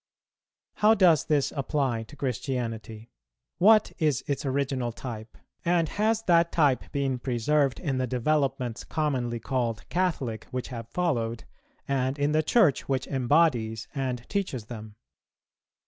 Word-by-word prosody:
How 215 +1 +5
does 170 -8 +4
this 145 -3 +1
apply 135 -4 0
to 140 - -14
Christianity? 115 -4 -4 0.5
What 215 +3 +6
is 150 -7 +1
its 140 0 -2
original 130 -2 -1
type? 115 -2 -8 0.3
and 170 -2 +2
has 220 +1 0
that 170 -3 +3
type 145 -6 +2
been 135 -3 -1
preserved 135 +3 +1
in 135 -6 -2
the 130 - 0
developments 130 -1 0
commonly 130 -7 -1
called 120 -2 -2
Catholic, 160 -11 -1
which 125 -1 -4
have 115 -3 -7
followed, 120 -10 -1 0.4
and 135 0 0
in 145 +1 +1
the 155 +1 +3
Church 155 - +3
which 130 -2 0
embodies 125 -5 +1
and 130 -4 -3
teaches 185 - -2
them? 110 -2 -9
135 Hz, 130 wpm, -27 LUFS, 120-155 Hz, 0.5 s, What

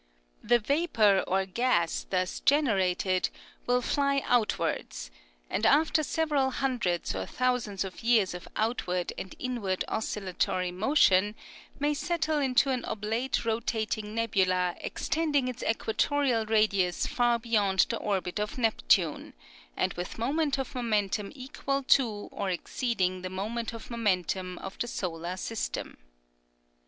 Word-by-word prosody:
The 240 +1 +4
vapor 230 - +2
or 190 +1 +1
gas 190 -4 0
thus 185 -1 -1
generated 195 -9 +2 0.4
will 250 0 +2
fly 280 0 +1
outwards, - - 0 0.4
and - - -2
after 310 +2 +4
several 295 -3 +1
hundreds 245 -10 -1
or 95 0 -4
thousands 250 -6 0
of 190 -2 -8
years 225 -6 +3
of 180 0 -8
outward 180 -6 -1
and 190 - -7
inward 230 -8 -2
oscillatory 185 -4 -1
motion, 205 -1 +3 0.4
may 290 +1 +1
settle 315 0 0
into 270 0 +3
an 255 -2 -1
oblate 225 +5 -2
rotating 220 -1 -2
nebula 185 -5 +1
extending 295 -5 0
its 250 -1 -5
equatorial 230 +1 +1
radius 205 -5 +2
far 240 -1 +2
beyond 210 -5 +2
the 230 - -1
orbit 190 -2 -2
of 210 +3 -3
Neptune, 210 - +1 0.4
and - - +1
with 175 +1 -6
moment 280 +4 0
of 270 0 -4
momentum 210 -5 -1
equal 275 +1 -3
to 230 -6 +2
or 200 -1 -3
exceeding 185 -1 -1
the 185 - -4
moment 220 +5 -3
of 230 +1 -9
momentum 185 -5 -1
of 195 - -7
the 240 - -1
solar 175 -3 -4
system. 225 - -4
220 Hz, 125 wpm, -29 LUFS, 190-255 Hz, 0.4 s, The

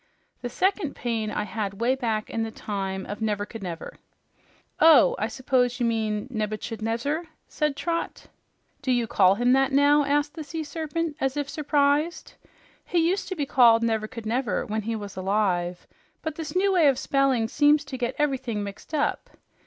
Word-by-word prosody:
The 245 - -4
second 375 - 0
pain 225 -3 -2
I - - -2
had 205 -1 -4
way 240 +3 +2
back 225 -5 -2
in 225 - -2
the 225 - -2
time 195 -3 -4
of 205 - -6
Nevercouldnever." 205 -4 -4 0.8
"Oh, 330 +10 +7
I - - 0
s'pose 255 -1 0
you 240 - +1
mean 220 -2 -1
Nebuchadnezzar," 225 +7 -2 0.2
said 300 -2 -1
Trot. 335 +3 -3 0.6
"Do 265 -2 -1
you 240 -2 +2
call 195 -5 +4
him 245 +3 +3
that 270 +1 +3
now?" 285 +2 +5
asked 290 +1 0
the 315 - -6
Sea 315 +2 -5
Serpent 315 +1 -3
as 270 +1 0
if 290 -1 -1
surprised. 295 +2 0 0.5
"He 335 -2 +1
used 380 +3 -1
to 375 - -3
be 295 -4 -1
called 235 -4 +5
Nevercouldnever 225 0 -1
when 215 +1 -2
he 225 +2 -3
was 205 -2 -7
alive, 185 -2 0 0.4
but 315 - -2
this 305 0 -6
new 390 +2 +3
way 340 -5 +5
of 270 -3 +3
spelling 270 -5 +1
seems 290 +3 +3
to 275 -1 -6
get 245 -2 -2
everything 260 -7 -1
mixed 200 +9 -7
up. 290 - -1
250 Hz, 170 wpm, -25 LUFS, 215-295 Hz, 0.8 s, Oh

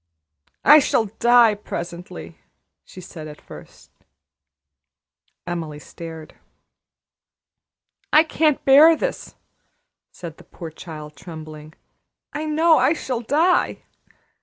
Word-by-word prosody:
"I 300 - +9
shall 235 -5 +1
die 240 -2 +5
presently!" 170 - -8 0.4
she 185 - -13
said 160 -3 -10
at 150 0 -11
first. - - -15 1.5
Emily 165 -4 -5
stared. 160 +1 -10 1.8
"I 310 - +6
can't 315 -2 0
bear 300 +5 +7
this!" - - -5 0.8
said 165 -3 -10
the - - -16
poor 165 -3 -10
child, 155 -2 -10
trembling. 155 -1 -11 0.6
"I 300 +2 -4
know 315 +1 +3
I 300 - +3
shall 255 -7 -4
die. 320 +9 +1
180 Hz, 100 wpm, -21 LUFS, -, 1.8 s, I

